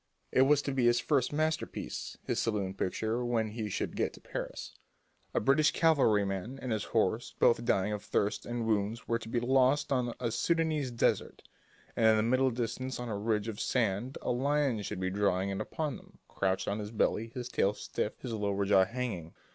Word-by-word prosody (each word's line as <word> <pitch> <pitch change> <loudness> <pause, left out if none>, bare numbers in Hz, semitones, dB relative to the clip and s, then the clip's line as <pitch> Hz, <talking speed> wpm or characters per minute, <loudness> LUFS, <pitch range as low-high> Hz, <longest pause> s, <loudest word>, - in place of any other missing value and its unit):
It 130 - +4
was 145 -1 +4
to 140 - -2
be 130 -2 +1
his 120 0 +4
first 135 -2 +1
masterpiece, 155 +1 -2
his - - -1
salon 100 -4 -1
picture 110 +5 -1
when 115 -2 0
he 110 -1 -4
should - - -3
get - - 0
to - - -13
Paris. - - -6 0.6
A - - +1
British 140 +6 +4
cavalryman 110 - +2
and 130 -2 -4
his 110 -2 -1
horse, 110 +1 0
both 115 0 +4
dying 100 -2 +2
of 105 - -4
thirst 105 0 0
and 120 -1 -3
wounds, 110 +1 -1
were 115 0 +1
to 110 - -9
be 120 - +1
lost 135 +4 +3
on 125 -3 0
a 120 -2 -1
Soudanese 160 -1 +1
desert, 120 -1 0 0.5
and 110 - +4
in 110 0 +6
the 110 - +2
middle 130 +3 +3
distance 125 +2 -3
on 125 -1 -4
a 105 - -2
ridge 105 +1 0
of 110 -2 -5
sand 115 +1 0
a - - 0
lion 135 -2 +1
should 95 - -5
be 95 0 -1
drawing 100 -1 +1
in 95 - -2
upon 155 -4 -3
them, - - -19
crouched 95 -1 -1
on 100 +2 -1
his 105 -1 -5
belly, 110 0 0
his 125 -1 -4
tail 100 -3 +1
stiff, - - -4
his 120 - -4
lower 100 -2 0
jaw 95 -1 +5
hanging. 100 -7 -4
115 Hz, 200 wpm, -31 LUFS, 105-130 Hz, 0.6 s, in